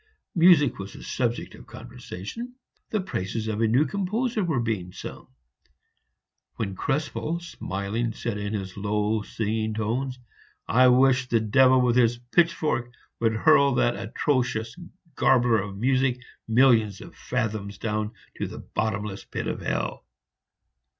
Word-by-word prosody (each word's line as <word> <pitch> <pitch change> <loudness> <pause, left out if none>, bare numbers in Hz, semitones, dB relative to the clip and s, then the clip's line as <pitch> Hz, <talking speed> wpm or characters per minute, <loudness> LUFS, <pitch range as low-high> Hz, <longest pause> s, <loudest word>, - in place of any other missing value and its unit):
Music 165 - +5
was 95 +1 -7
the - - -11
subject 120 -2 -2
of - - -14
conversation; 165 - -8 0.3
the 215 - 0
praises 110 - -3
of 110 0 -2
a 115 - +4
new 125 +7 +3
composer 210 - -1
were 160 -8 0
being 105 -6 -2
sung, - - -9 1.3
when 100 -3 -3
Krespel, 150 - -2
smiling, 110 - -3
said 115 -1 -4
in 100 +1 -3
his 95 -2 -5
low, 105 +2 0
singing 110 +1 -2
tones, 125 +4 -2 0.5
"I 130 +3 +5
wish 130 0 +4
the 115 -2 +2
devil 130 +4 +5
with 125 -1 +2
his 120 -1 +4
pitchfork 120 -2 +1 0.3
would 115 -1 +2
hurl 140 +1 +5
that 120 0 +2
atrocious 120 -1 -1 0.4
garbler 120 -4 +3
of 100 -1 -7
music 130 +2 +1 0.3
millions 110 -4 +4
of - - -11
fathoms 110 -5 -3
down 105 0 -2 0.2
to - - -2
the - - -9
bottomless 105 -2 -3
pit - - -4
of - - -3
hell!" - - -2
120 Hz, 135 wpm, -26 LUFS, 105-135 Hz, 1.3 s, Music